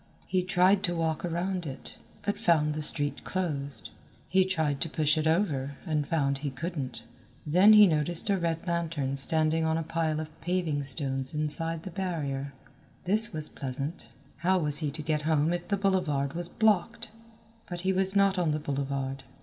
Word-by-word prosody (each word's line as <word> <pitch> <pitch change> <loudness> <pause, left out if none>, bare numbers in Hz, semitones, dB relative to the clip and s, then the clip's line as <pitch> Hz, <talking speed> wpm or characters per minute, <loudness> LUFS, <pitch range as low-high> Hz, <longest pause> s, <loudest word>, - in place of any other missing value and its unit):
He 185 0 0
tried 185 +2 +3
to 175 - -2
walk 160 -2 -1
around 175 0 -2
it, 135 -1 -9 0.2
but 205 - -1
found 150 -3 +2
the 155 - -4
street 145 -2 0
closed. 145 -7 -2 0.4
He 190 0 +3
tried 160 -7 -1
to 165 - -2
push 155 0 +1
it 155 0 0
over, 150 -6 0
and 150 -4 -1
found 140 -4 0
he 145 0 -3
couldn't. 135 -5 -5 0.4
Then 185 +8 +6
he 210 -1 +9
noticed 165 0 +2
a 195 - +1
red 165 0 -2
lantern 165 -5 -1
standing 155 +3 +2
on 160 0 +1
a 165 - -2
pile 160 -1 -1
of 155 0 -8
paving 175 -4 -1
stones 135 0 -1
inside 160 +2 0
the 190 - -7
barrier. 145 -7 -3 0.5
This 210 +4 +2
was 155 -2 -3
pleasant. 135 0 -4 0.3
How 185 +2 +2
was 150 -4 +4
he 155 -3 -1
to 155 +2 -7
get 155 -1 0
home 155 +1 +1
if 175 0 -4
the 200 - 0
boulevard 175 -8 0
was 175 +1 -3
blocked? 215 -1 0 0.6
But 175 -1 -5
he 190 +1 +1
was 190 +1 +3
not 200 -1 +3
on 170 -3 +1
the 155 - -1
boulevard. 135 -1 -3
160 Hz, 180 wpm, -28 LUFS, 145-180 Hz, 0.6 s, he